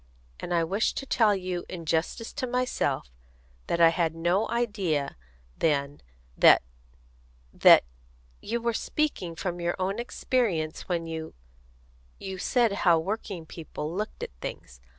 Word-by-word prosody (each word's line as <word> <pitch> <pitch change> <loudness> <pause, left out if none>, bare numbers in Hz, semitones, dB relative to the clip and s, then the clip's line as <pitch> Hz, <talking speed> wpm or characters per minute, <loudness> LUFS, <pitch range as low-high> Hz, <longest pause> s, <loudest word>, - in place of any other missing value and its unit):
And - - -6
I 170 -1 +3
wish 195 +7 0
to 275 - -4
tell 220 -6 +3
you, 180 -2 -3
in 170 -3 -7
justice 165 +8 -1
to 260 -3 -3
myself, 250 - -1 0.6
that 170 - 0
I 165 -1 +8
had 165 -1 0
no 175 +6 +1
idea 200 -12 -1 0.4
then 145 -2 0 0.3
that - - +7 0.9
that - - +8 0.6
you 235 +3 -2
were 235 0 0
speaking 220 - -1
from 175 +1 -3
your 170 0 0
own 195 +3 -1
experience 210 -11 -1
when 170 -2 -1
you 160 - -6 0.8
you 190 -1 -6
said 235 +2 +2
how 170 -2 +5
working 190 -1 -4
people 160 -1 -6
looked 210 +4 -4
at - - -5
things. - - -7
180 Hz, 140 wpm, -27 LUFS, 165-220 Hz, 0.9 s, I